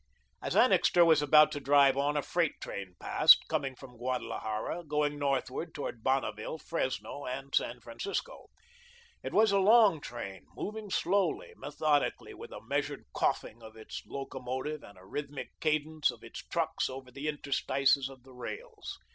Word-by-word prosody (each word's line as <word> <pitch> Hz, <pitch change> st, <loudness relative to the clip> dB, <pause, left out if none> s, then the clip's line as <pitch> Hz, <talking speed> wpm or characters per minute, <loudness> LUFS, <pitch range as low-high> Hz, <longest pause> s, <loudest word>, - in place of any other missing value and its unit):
As -, -, -3 dB
Annixter 175 Hz, -1 st, +5 dB
was 160 Hz, -2 st, +5 dB
about 150 Hz, +1 st, +6 dB
to 145 Hz, -, -3 dB
drive 140 Hz, -1 st, +5 dB
on, 145 Hz, +2 st, +1 dB
a 145 Hz, -, 0 dB
freight 170 Hz, -3 st, 0 dB
train 95 Hz, -2 st, -7 dB
passed, -, -, +6 dB
coming 135 Hz, -1 st, -1 dB
from 125 Hz, -2 st, -13 dB
Guadalajara, 125 Hz, +3 st, -3 dB
going 150 Hz, -1 st, -1 dB
northward 140 Hz, +3 st, -1 dB
toward 130 Hz, -6 st, -5 dB
Bonneville, 130 Hz, 0 st, -1 dB
Fresno 140 Hz, -3 st, -3 dB
and 135 Hz, +2 st, -5 dB
San 120 Hz, +1 st, +1 dB
Francisco. 195 Hz, -, -5 dB, 0.7 s
It -, -, -5 dB
was 215 Hz, -1 st, +4 dB
a 200 Hz, -, +4 dB
long 205 Hz, -5 st, +6 dB
train, 100 Hz, -8 st, -7 dB
moving 215 Hz, 0 st, -5 dB
slowly, 190 Hz, 0 st, 0 dB
methodically, 145 Hz, +1 st, 0 dB
with -, -, -10 dB
a -, -, -8 dB
measured -, -, -2 dB
coughing 115 Hz, -, -1 dB
of 110 Hz, 0 st, -12 dB
its 110 Hz, -1 st, -8 dB
locomotive 135 Hz, +2 st, -4 dB
and 100 Hz, -, -14 dB
a 90 Hz, -, -16 dB
rhythmic 145 Hz, +6 st, -5 dB
cadence 155 Hz, 0 st, +1 dB
of -, -, -7 dB
its -, -, -8 dB
trucks -, -, -1 dB
over 130 Hz, -1 st, -8 dB
the 140 Hz, +4 st, -5 dB
interstices 140 Hz, -2 st, +1 dB
of 130 Hz, -2 st, -14 dB
the 130 Hz, 0 st, -16 dB
rails. 445 Hz, -, -7 dB
140 Hz, 155 wpm, -31 LUFS, 130-155 Hz, 0.7 s, about